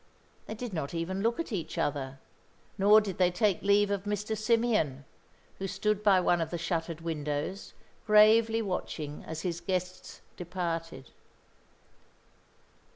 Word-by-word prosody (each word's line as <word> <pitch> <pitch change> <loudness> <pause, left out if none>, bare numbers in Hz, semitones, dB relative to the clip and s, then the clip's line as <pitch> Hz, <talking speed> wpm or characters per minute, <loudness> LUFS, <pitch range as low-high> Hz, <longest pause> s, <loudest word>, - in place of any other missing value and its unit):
They 220 - -5
did 235 -1 -6
not 155 -1 -4
even 185 +4 -2
look 230 +6 0
at 335 - -3
each 185 -7 -4
other, 135 -2 -2 0.6
nor 210 +2 +6
did 195 -4 -5
they 180 -1 +5
take 190 0 +1
leave 200 0 +3
of 200 0 -2
Mr. 210 +1 -2
Symeon, 215 - +1 0.6
who 195 - -3
stood 205 +2 -1
by 200 -3 +5
one 175 -1 +2
of 160 - -2
the 175 - -3
shuttered 165 -1 -3
windows, 150 +3 -4 0.3
gravely 220 +1 +5
watching 155 -6 -4
as 160 -1 -5
his 175 -2 -3
guests 185 0 -4 0.2
departed. 165 -6 -4
185 Hz, 140 wpm, -29 LUFS, 165-210 Hz, 0.6 s, nor